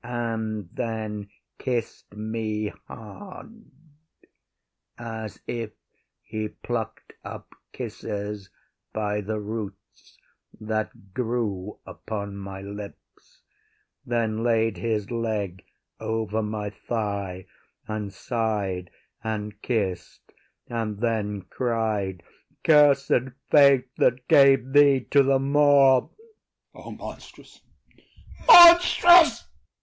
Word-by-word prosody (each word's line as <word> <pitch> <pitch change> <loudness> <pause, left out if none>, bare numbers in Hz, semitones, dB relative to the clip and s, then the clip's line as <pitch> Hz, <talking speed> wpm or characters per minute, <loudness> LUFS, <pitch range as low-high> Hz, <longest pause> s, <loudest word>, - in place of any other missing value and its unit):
” - - -43
and 110 -4 -3
then 110 -3 -4 0.3
kiss 120 -4 -3
me 110 0 -3 0.2
hard, 190 - -11 1.3
As 110 -2 -7
if 115 -3 -5 0.5
he 110 0 -4
pluck’d 115 +1 -6
up - - -10 0.2
kisses 105 -1 -6 0.4
by 105 -1 -2
the 105 +2 -4
roots, 105 -1 -8 0.4
That 110 -3 -5
grew 110 -5 -3
upon 100 -2 -6
my 95 -1 -8
lips, 100 0 -11 0.6
then 115 -2 -1
laid 115 -2 +1
his 110 -3 -2
leg 105 -6 -3 0.4
Over 110 -1 -2
my 105 -1 -4
thigh, 100 -4 -4 0.4
and 110 -2 -4
sigh’d 100 -6 -3 0.3
and 105 -1 -4
kiss’d, 100 -7 -3 0.3
and 110 -3 -3
then 105 -4 -2
Cried 105 -4 -2 0.4
“Cursed 140 -4 +4 0.2
fate 135 -3 +5
that 125 0 +1
gave 135 -2 +5
thee 140 -2 +6
to 140 - +6
the 135 0 +3
Moor!” 140 -1 +4 0.6
OTHELLO. - - -14
O - - -6
monstrous! - - -11 0.9
monstrous! 345 0 +8
110 Hz, 95 wpm, -25 LUFS, 105-125 Hz, 1.3 s, monstrous